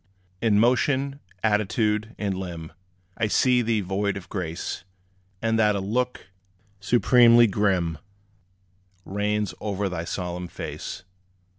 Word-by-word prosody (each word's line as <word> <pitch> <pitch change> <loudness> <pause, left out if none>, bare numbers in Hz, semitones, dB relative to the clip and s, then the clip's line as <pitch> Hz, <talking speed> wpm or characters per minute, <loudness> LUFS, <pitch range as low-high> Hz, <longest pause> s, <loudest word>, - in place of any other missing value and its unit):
In 105 -3 +3
motion, 135 +4 +2 0.2
attitude 105 +1 +1
and 100 -2 -2
limb 85 -4 -6 0.5
I 110 - +1
see 125 +3 +3
thee 115 -2 +1
void 100 +2 -1
of 100 0 -10
grace; 90 -2 -4 0.6
And 115 0 +2
that 105 -2 +4
a - - 0
look 125 +6 -2 0.5
supremely 120 +2 +6
grim, 95 -6 0 1.1
Reigns 105 0 -1
o'er 100 -1 -2
thy 85 -2 -4
solemn 90 0 -4
face. 90 - -7
105 Hz, 115 wpm, -25 LUFS, 95-115 Hz, 1.1 s, supremely